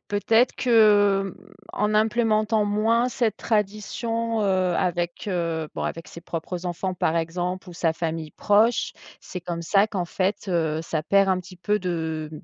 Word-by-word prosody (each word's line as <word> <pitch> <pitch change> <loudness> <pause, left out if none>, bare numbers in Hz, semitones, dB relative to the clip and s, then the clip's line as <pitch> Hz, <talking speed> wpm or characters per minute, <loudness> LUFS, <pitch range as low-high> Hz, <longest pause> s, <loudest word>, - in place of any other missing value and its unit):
peut-être 225 +4 +2
que, 205 -5 +4
mmh, - - -19 0.2
en 210 +1 0
implémentant 215 0 +2
moins 225 +4 +2
cette 230 -3 -1
tradition, 225 +2 -1
heu- - - +1 0.3
avec, 175 +2 -2
heu, 165 -4 -2
bon, - - -3
avec 165 - -5
ses 170 - -10
propres 175 +2 -5
enfants, 180 +2 -3
par 165 -2 0
exemple, 175 +3 -3
ou - - -9
sa 165 -1 +1
famille 160 -2 -4
proche, 220 +3 +2 0.3
c'est 180 - -7
comme 170 -1 -5
ça 195 +4 +3
qu'en 195 -5 -3
fait, 195 +3 -2
heu, 160 -3 0
ça 160 -2 -2
perd 195 +1 +4
un 185 -1 +2
petit 185 0 -13
peu 205 +4 0
de 160 -4 -3
190 Hz, 165 wpm, -24 LUFS, 170-215 Hz, 0.3 s, que